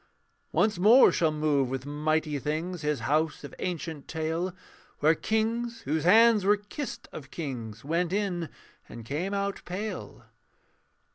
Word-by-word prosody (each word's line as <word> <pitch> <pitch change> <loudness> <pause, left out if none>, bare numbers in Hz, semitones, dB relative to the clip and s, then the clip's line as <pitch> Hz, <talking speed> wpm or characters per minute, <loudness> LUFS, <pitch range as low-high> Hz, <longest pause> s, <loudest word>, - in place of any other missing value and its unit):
Once 210 -4 +2
more 225 +8 +7
shall 160 -2 +2
move 150 -4 +1
with 130 0 -4
mighty 150 0 0
things 160 +5 -3
His 150 -2 -1
house 155 +1 0
of 145 - -9
ancient 165 -5 -4
tale, 160 +3 -2 0.5
Where 155 +2 +4
kings 230 +5 -1
whose 155 -2 -1
hands 220 +2 +6
were 205 +2 +4
kissed 205 +7 -7
of 135 -3 -9
kings 120 -8 -6
Went 170 +3 0
in: 185 -5 -1 0.4
and 115 -2 -9
came 170 - -2
out 200 0 -2
pale. 185 - -6
165 Hz, 140 wpm, -28 LUFS, 150-200 Hz, 0.5 s, more